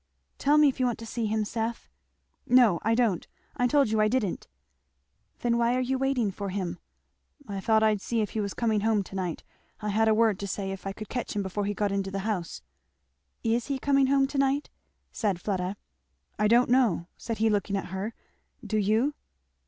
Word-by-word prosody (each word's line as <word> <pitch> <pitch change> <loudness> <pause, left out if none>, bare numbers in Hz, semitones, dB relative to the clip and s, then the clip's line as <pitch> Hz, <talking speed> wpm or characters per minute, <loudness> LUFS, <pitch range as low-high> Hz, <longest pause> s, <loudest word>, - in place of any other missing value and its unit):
"Tell 290 +2 +4
me 300 -1 +7
if 270 - -1
you 255 - +3
want 240 - -1
to 230 - -8
see 225 0 -2
him, 215 0 0
Seth." 225 +2 -3 0.6
"No 240 -9 +5
I 225 +1 +2
don't 225 -7 +1 0.3
I 245 -3 +2
told 275 -4 +3
you 220 -1 +2
I 215 - +4
didn't." 215 -5 -1 0.9
"Then 235 -1 +1
why 235 +1 +2
are - - +1
you 260 +1 0
waiting 260 -6 +1
for 200 +1 -5
him?" 185 -2 -3 0.7
"I 200 -1 -4
thought 220 +2 +3
I'd 215 -2 +2
see 235 +2 -1
if 210 - -2
he 220 - -3
was 200 -2 -3
coming 220 -3 +1
home 215 -1 +2
to 195 - -11
night 180 -4 -3 0.4
I 210 - -3
had 220 +2 +2
a 220 - +4
word 220 -3 +3
to 200 - -4
say 195 0 -3
if 195 0 -6
I - - -2
could 215 +2 -8
catch 245 -4 -4
him 205 - 0
before 195 +2 -2
he 205 0 -2
got 205 0 0
into 195 -1 -1
the 195 0 -4
house." 185 -6 -3 0.8
"Is 230 +1 0
he 280 -2 -1
coming 275 0 +3
home 275 0 +4
to 275 +1 -3
night?" 275 +1 +1 0.4
said 200 -6 -1
Fleda. 190 0 -2 0.6
"I 210 - +4
don't 240 +2 +4
know!" 235 -10 +3
said 230 -2 -5
he 220 +1 +2
looking 200 -1 0
at 195 - -5
her. 200 +4 -4 0.5
"Do 215 - -1
you?" 220 +8 +2
220 Hz, 215 wpm, -27 LUFS, 200-245 Hz, 0.9 s, me